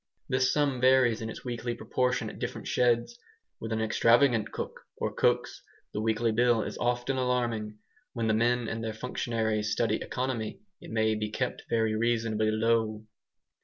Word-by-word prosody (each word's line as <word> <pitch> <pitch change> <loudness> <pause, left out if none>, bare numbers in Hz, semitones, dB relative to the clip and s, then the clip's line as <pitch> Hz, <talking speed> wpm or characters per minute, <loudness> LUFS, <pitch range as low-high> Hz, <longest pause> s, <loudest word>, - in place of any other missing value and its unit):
This 130 0 +2
sum 140 -4 +1
varies 130 -3 +4
in 110 - -4
its - - -9
weekly 120 -1 -3
proportion 125 +1 0
at - - -8
different - - -5
sheds. 120 - +1 0.4
With 115 - -6
an 110 0 0
extravagant 115 0 +3
cook, - - -5 0.2
or - - -2
cooks, - - +1 0.3
the 105 - -2
weekly 115 +1 +1
bill 120 0 +3
is - - -5
often 120 +2 0
alarming. 120 -4 -1 0.4
When 115 -2 -2
the 110 - +2
men 120 +1 +2
and 115 0 -3
their 110 -1 -3
functionary 110 -2 -1
study 105 +1 0
economy 125 - -3 0.2
it - - -10
may 110 -1 +1
be 105 0 -2
kept 125 +4 -3
very 110 -1 +1
reasonably 110 -1 +1
low. 110 -1 +1
115 Hz, 165 wpm, -29 LUFS, 110-125 Hz, 0.4 s, varies